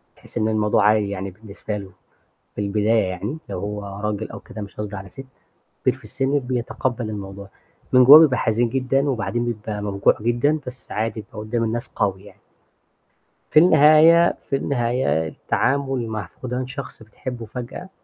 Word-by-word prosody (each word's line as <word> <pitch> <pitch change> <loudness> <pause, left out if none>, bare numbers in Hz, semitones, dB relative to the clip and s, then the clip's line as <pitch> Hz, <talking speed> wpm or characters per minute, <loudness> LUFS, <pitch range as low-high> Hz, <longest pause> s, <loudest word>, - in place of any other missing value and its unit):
تحسّي - - -8
إن 110 - +1
الموضوع 105 -1 +2
عادي 105 -1 +3
يعني 100 -1 -4
بالنسبة 105 +1 -7
له 100 -2 -9 0.6
في - - -5
البداية 105 +2 +2
يعني 105 - -4
لو 90 - -4
هو 100 0 -5
راجل 105 +1 -3
أو - - -8
كده، 110 - -9
مش 100 - -10
قصدي 105 -1 -5
على 95 0 -8
سِت، 135 +8 -10 0.6
كبير 130 - +2
في 130 - -18
السِن 135 +2 0
بيتقبّل 125 -2 -3
الموضوع، 100 -1 -7 0.4
من 125 0 +7
جوّاه 140 +4 +11
بيبقى 140 -6 +4
حزين 115 +2 +1
جدًا 135 +3 0
وبعدين 120 -1 -2
بيبقى 105 -2 -4
موجوع 100 -1 +2
جدًا، 120 +7 +1
بس 125 0 -9
عادي 110 +1 -2
بيبقى 105 +1 -13
قدّام 115 +2 -2
الناس 115 +1 -3
قوي 95 -2 -2
يعني. 105 - -16 1.1
في - - +5
النهاية 160 +1 +6 0.2
في 140 - +2
النهاية 120 - 0
التعامل 135 - -1
مع 110 -4 -4
فُقدان 125 0 -4
شخص 135 -3 -8
بتحبّوا 115 +2 -7
فجأة 125 - -7
115 Hz, 165 wpm, -22 LUFS, 105-130 Hz, 1.1 s, جوّاه